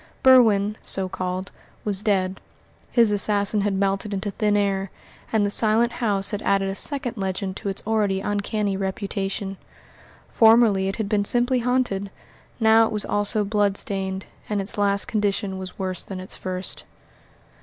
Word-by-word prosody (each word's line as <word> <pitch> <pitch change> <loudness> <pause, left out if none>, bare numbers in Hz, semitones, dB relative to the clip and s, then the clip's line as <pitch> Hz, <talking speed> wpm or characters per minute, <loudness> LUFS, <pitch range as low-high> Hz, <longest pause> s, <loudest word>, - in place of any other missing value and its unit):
Berwin 215 -5 +5
so 190 -1 +1
called 185 +1 -4 0.3
was 200 -2 +2
dead, 190 -3 0 0.5
his 230 -3 +4
assassin 205 0 +2
had 200 -1 0
melted 195 +1 -1
into 200 +1 -3
thin 210 +1 +1
air, 195 -1 0 0.4
and 215 -2 +2
the 205 - -1
Silent 225 +3 +3
House 200 -3 +1
had 205 - -3
added 195 -1 +1
a - - -2
second 260 +2 -2
legend 190 0 -3
to 200 - -4
its 195 - -5
already 210 -3 +1
uncanny 205 0 -1
reputation. 195 0 -3 0.7
Formerly 225 -4 +5
it 195 - -2
had 220 -3 -3
been 205 0 +1
simply 245 +4 +1
haunted, 245 -5 0 0.5
now 225 0 +5
it - - -6
was 210 -2 -2
also 205 +1 0
blood 205 -1 +1
stained, 190 -1 -3 0.2
and 210 -1 0
its 195 +1 -3
last 200 -1 +1
condition 200 -2 -1
was 185 -1 -8
worse 185 -1 -3
than 190 -2 -7
its 185 - -5
first. 185 0 -5
200 Hz, 160 wpm, -23 LUFS, 195-215 Hz, 0.7 s, Berwin